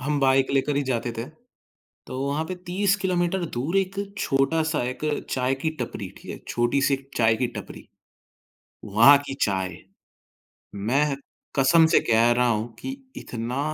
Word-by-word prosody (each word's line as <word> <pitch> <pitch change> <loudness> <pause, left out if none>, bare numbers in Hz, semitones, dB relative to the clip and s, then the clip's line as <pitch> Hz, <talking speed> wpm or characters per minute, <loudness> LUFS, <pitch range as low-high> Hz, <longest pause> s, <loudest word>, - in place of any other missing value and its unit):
हम 145 +2 -1
बाइक 135 0 +3
लेकर 140 +1 +1
ही 145 - +2
जाते 120 -2 -2
थे। 115 - -2 0.8
तो 130 - -6
वहाँ 140 +3 -1
पे 185 - -5
30 195 +2 +2
किलोमीटर 180 -1 0
दूर 155 +10 -1
एक 190 0 -1 0.2
छोटा-सा 155 +2 +1
एक 125 +4 -5 0.3
चाय 130 +1 +1
की 160 +4 -2
टपरी, - - -4
ठीक - - -10
है? - - -8
छोटी-सी 135 +4 +2
एक 135 0 -8
चाय 110 -1 +3
की 125 - 0
टपरी, - - -9 1.0
वहाँ 115 +8 +7
की 135 - -4
चाय। 95 -4 -2 1.0
मैं 135 +8 +1 0.4
कसम 160 +5 +5
से 160 - +4
कह 115 +1 +5
रहा 125 +1 +2
हूँ 115 +1 -1
कि 265 - -5 0.2
इतना 120 +3 -4
135 Hz, 155 wpm, -25 LUFS, 120-160 Hz, 1.0 s, वहाँ